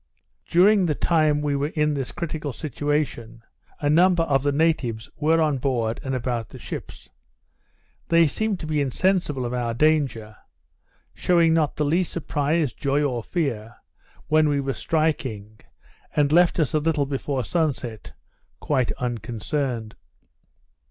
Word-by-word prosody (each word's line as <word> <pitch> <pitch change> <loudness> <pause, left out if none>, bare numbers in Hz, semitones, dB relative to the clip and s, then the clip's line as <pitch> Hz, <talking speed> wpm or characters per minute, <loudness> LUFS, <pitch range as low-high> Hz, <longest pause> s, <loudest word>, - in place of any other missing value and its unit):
During 190 +2 +4
the 150 - -1
lime 155 -3 +3
we 145 -1 0
were 140 +1 0
in 150 -1 0
this 135 -3 -3
critical 155 -4 -4
situation, 135 -4 -3 0.4
a 145 - -1
number 175 +3 +4
of 140 -4 +1
the 145 +1 +1
natives 140 -8 0
were 160 +2 +2
on 150 -4 +1
board 120 -4 -1
and 135 -1 -2
about 120 -2 -3
the - - -11
ships. 65 - -8 1.0
They 170 0 +5
seemed 205 +6 -1
to - - -5
be 155 -1 0
insensible 150 -1 0
of 120 - -3
our 120 -2 -2
danger, 130 -7 +1 0.8
shewing 170 -2 +3
not 160 -3 +1
the 150 - 0
least 170 +4 +1
surprise, 150 -3 -1
joy, 140 +4 0
or 125 -5 -1
fear, 120 -7 -3 0.5
when 155 0 +3
we 145 -1 +1
were 135 -1 -2
striking, 130 -9 -2 0.6
and 145 -1 +2
left 175 +2 +4
us 155 0 +1
a 155 - +3
little 150 -2 +1
before 135 -1 -2
sun 160 +5 +1
set, 115 -4 -9 0.5
quite 130 -5 0
unconcerned. 120 0 -3
145 Hz, 145 wpm, -24 LUFS, 125-160 Hz, 1.0 s, They